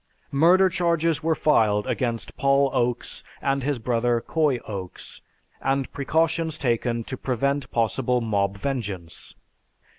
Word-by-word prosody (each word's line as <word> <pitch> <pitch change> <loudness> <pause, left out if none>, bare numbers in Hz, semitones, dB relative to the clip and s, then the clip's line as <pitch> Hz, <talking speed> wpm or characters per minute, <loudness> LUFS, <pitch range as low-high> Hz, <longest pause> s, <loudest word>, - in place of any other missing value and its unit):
Murder 175 +7 +5
charges 170 -3 +1
were 160 0 +1
filed 105 -10 +3
against 120 -3 -2
Paul 140 0 +3
Oaks 125 -2 -1 0.2
and 135 0 0
his 140 +1 -1
brother, 120 0 +1
Coy 150 +1 +1
Oaks, 95 -4 -7 0.4
and 135 0 -1
precautions 160 +2 0
taken 120 -3 0
to 130 - -5
prevent 135 +2 -1
possible 125 +2 +1
mob 100 -3 0
vengeance. 100 -9 -5
130 Hz, 120 wpm, -24 LUFS, 115-145 Hz, 0.4 s, Murder